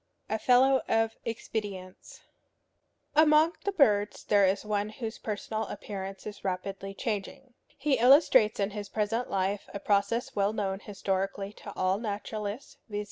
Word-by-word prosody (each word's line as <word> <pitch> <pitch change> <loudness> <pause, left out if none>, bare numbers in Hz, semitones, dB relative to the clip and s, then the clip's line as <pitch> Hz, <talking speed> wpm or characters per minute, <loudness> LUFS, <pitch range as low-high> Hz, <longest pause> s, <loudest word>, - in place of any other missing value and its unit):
XI. - - -1
A 220 - 0
FELLOW 260 +3 +5
OF 225 0 +1
EXPEDIENTS. 205 -5 -6 0.9
Among 310 +2 +5
the 400 - +1
birds 210 - +2
there 200 -2 +4
is 195 +2 0
one 210 0 -1
whose 220 0 -6
personal 215 0 -3
appearance 195 -1 -7
is 210 -1 -8
rapidly 195 +1 -4
changing. 225 +5 -4 0.2
He 275 -2 +1
illustrates 255 -4 +5
in 200 +1 0
his 205 -1 -6
present 225 +3 -1
life 195 +1 -1
a - - -3
process 205 +4 0
well 200 +1 +1
known 195 -3 -2
historically 195 0 -3
to 205 - -10
all 185 +1 +1
naturalists, 210 +2 -5
viz. 205 -1 -3
210 Hz, 145 wpm, -29 LUFS, 195-230 Hz, 0.9 s, FELLOW